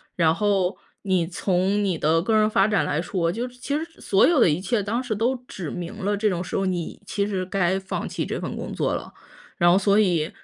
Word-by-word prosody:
然 165 -2 +3
后 200 -2 +1 0.3
你 185 -4 +1
从 190 +3 0
你 185 -4 0
的 160 +2 +2
个 220 +4 +1
人 215 0 +4
发 195 -1 +3
展 210 -1 +2
来 150 +2 0
说， 170 -1 -1
就 240 +5 -3
是 250 0 -15
其 280 +3 -4
实 320 - -3 0.2
所 195 - +4
有 335 -3 +3
的 180 - +6
一 150 +4 +1
切 205 +2 0
当 230 +5 -1
时 245 -4 -3
都 235 +5 +1
指 170 -6 -6
明 175 -1 -5
了 205 +1 +1
这 215 +1 +2
种 180 -2 -2
时 - - -6
候 195 - 0
你 180 -3 -3
其 200 0 -1
实 190 -3 -2
该 190 0 0
放 190 0 -4
弃 - - -3
这 - - -3
份 - - -4
工 - - -5
作 - - 0
了。 - - -5 0.4
然 175 -1 +5
后 185 - +5
所 200 +1 +3
以 175 -7 +2
195 Hz, 265 characters per minute, -24 LUFS, 175-210 Hz, 0.4 s, 的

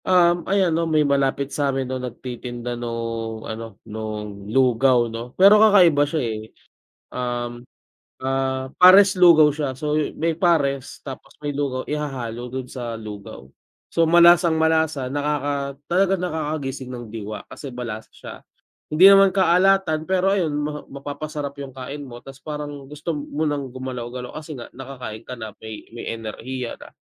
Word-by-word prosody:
Um, 175 -2 +3
ayan 190 -3 +2
'no 165 +1 0
may 155 -1 +3
malapit 140 0 0
sa 145 -1 0
'min 135 - 0
nung 130 0 -4
nagtitinda 125 -1 -6
nung 115 -2 -4
ano 110 -2 -7
nung 105 -2 -6
lugaw 125 -1 +3
'no. 120 +2 -7
Pero 200 +3 +7
kakaiba 175 -9 +6
siya, 155 -3 -1
eh. 110 -2 -3 0.7
Um, 120 -1 -4 0.6
ah, 130 0 -1
pares 190 +1 +8
lugaw 165 -4 +7
siya 145 -2 -3
so 150 +3 -1 0.2
may 165 0 -1
pares 140 -7 +1
tapos 135 -2 -9
may 145 - -2
lugaw 140 -2 -2
ihahalo 130 -6 -4
dun 130 -1 -5
sa 120 -3 -5
lugaw. 105 -10 -9 0.4
So 165 -1 +2
malasang 170 0 +6
malasa 160 -5 +1
nakaka 145 -1 -2 0.2
talagang 190 +1 +2
nakakagising 150 -6 -3
ng 120 -3 -8
diwa 105 -1 -6
kasi 135 -4 -8
malasa 115 -3 -6
siya, - - -10 0.6
hindi 185 +5 +9
naman 195 -1 +6
kaalatan 185 -3 +3
pero 190 +1 +2
ayun 160 -5 0
ma 150 0 -3
mapapasarap 145 +1 -6
yung 135 -2 -7
kain 140 +2 -7
mo 120 -1 -11
tas 135 0 -12
parang 145 -2 -6
gusto 150 +4 -6
mo 145 0 -4
ng 145 -4 -2
gumalaw-galaw 125 -1 -6
kasi 155 0 -8
nga 120 -3 -9
nakakain 125 -4 -8
ka 125 - -6
na 110 -3 -7
may 110 -1 -8
may 115 0 -5
enerhiya 120 +3 -6
na. - - -14
140 Hz, 155 wpm, -22 LUFS, 120-155 Hz, 0.7 s, hindi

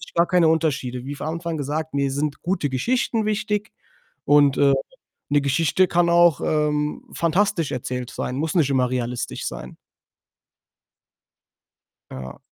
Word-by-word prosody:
gar 170 +1 +4
keine 175 -3 +3
Unterschiede. 140 -6 0
Wie 145 - -4
von 145 - -6
Anfang 165 0 -3
gesagt, 150 +2 -3
mir 140 -1 0
sind 145 +1 -2
gute 175 -5 -1
Geschichten 225 - 0
wichtig 210 0 -1 0.5
und, 145 -1 +5
äh, 140 -1 +4 0.6
'ne 145 0 +4
Geschichte 165 +6 +2
kann 170 0 +2
auch, 170 -3 +4
ähm, 150 -1 0
fantastisch 170 -1 +1
erzählt 125 0 -4
sein, 125 - -4
muss 155 +4 -2
nicht 155 -6 +3
immer 125 -2 +2
realistisch 125 -1 -3
sein. 60 +1 -7 2.3
Ja. 65 -1 -8
150 Hz, 135 wpm, -23 LUFS, 135-170 Hz, 2.3 s, und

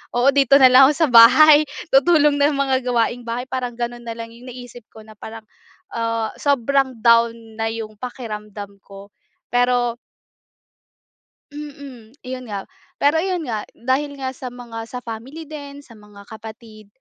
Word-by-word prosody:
Oo 245 +3 +4
dito 275 -1 +4
na 265 -2 +7
lang 260 +1 +8
ako 295 - +2
sa 320 -1 +1
bahay 295 +6 +8 0.3
tutulong 290 +1 +4
ng 290 +1 +3
mga 270 -1 +1
gawaing 240 0 -1
bahay 235 +2 -3
parang 250 -2 -4
ganun 240 0 -5
na 230 - -5
lang 230 0 -8
yung 235 +2 -15
naisip 245 -2 -11
ko 220 - -12
na 215 -1 -16
parang, 220 0 -10 0.5
ah, 230 -1 -2
sobrang 275 -1 +1
down 230 0 +4 0.3
na 225 - 0
yung 225 -1 -6
pakiramdam 210 -5 -8
ko, 200 0 -13 0.4
pero 245 -1 +1 1.5
Mm, 280 -5 -11
yun 255 -1 -7
nga, 200 -2 -5 0.3
pero 290 +3 +2
ayun 360 -1 -2
nga 220 -6 -5
dahil 270 +4 -2
nga 265 -1 -4
sa 260 0 -9
mga 235 -2 -9
sa 250 +1 -8
family 240 +8 -8
din, 285 -2 -10
sa 230 -5 -17
mga 205 -1 -16
kapatid, 220 -1 -12
245 Hz, 160 wpm, -20 LUFS, 225-275 Hz, 1.5 s, lang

